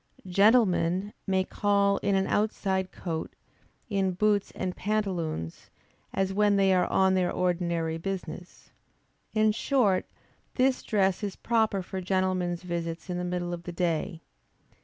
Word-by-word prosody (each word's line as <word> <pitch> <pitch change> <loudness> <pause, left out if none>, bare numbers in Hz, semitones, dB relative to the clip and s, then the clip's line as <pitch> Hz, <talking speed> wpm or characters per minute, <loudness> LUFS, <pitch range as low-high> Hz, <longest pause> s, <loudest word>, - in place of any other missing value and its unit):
Gentlemen 195 -1 +3
may 190 -1 +2
call 200 0 +2
in 200 - 0
an 190 0 +2
outside 190 -3 0
coat, 165 -3 -5 0.5
in 195 -4 0
boots 205 +1 +1
and 185 -1 -3
pantaloons, 180 - -3 0.4
as 195 0 -1
when 205 0 +3
they 195 -1 +4
are 180 -1 +3
on 190 0 +3
their 185 -1 +1
ordinary 170 -2 -1
business. 180 -1 -6 0.6
In 215 0 +4
short, 215 -4 +1 0.5
this 260 0 +2
dress 195 -3 +1
is 200 -3 -3
proper 220 -4 +1
for 190 +1 -5
gentlemen's 185 -1 0
visits 170 0 -4
in 175 - -2
the - - -2
middle 175 0 -2
of 170 - -5
the 175 - -7
day. 170 -2 -1
190 Hz, 140 wpm, -28 LUFS, 175-200 Hz, 0.6 s, they